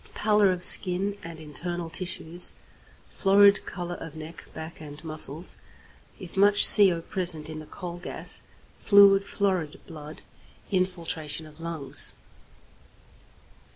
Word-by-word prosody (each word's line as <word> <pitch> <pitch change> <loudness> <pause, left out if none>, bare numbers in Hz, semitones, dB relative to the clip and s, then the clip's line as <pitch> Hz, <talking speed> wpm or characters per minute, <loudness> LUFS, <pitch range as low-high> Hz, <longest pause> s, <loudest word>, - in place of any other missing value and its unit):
_ - - -27
Pallor 210 -2 +2
of 180 -1 -4
skin 190 +2 +4
and 165 -1 -10
internal 170 +3 -7
tissues; 175 0 +1 0.5
florid 200 +1 +3
colour 175 -1 -7
of 160 -2 -11
neck, 160 +1 -11
back, 160 0 -10
and 150 0 -12
muscles, 155 +1 -3 0.6
if 185 -2 -12
much 205 +1 +4
CO 185 -5 +4
present 170 -5 +1
in 155 0 -8
the 155 - -12
coal 175 -1 -9
gas; - - -3 0.4
fluid 200 -1 +5
florid 190 -6 -3
blood; 155 -2 -12 0.5
infiltration 170 -4 -4
of 155 0 -17
lungs. 155 -4 -6
175 Hz, 120 wpm, -25 LUFS, 155-190 Hz, 0.6 s, fluid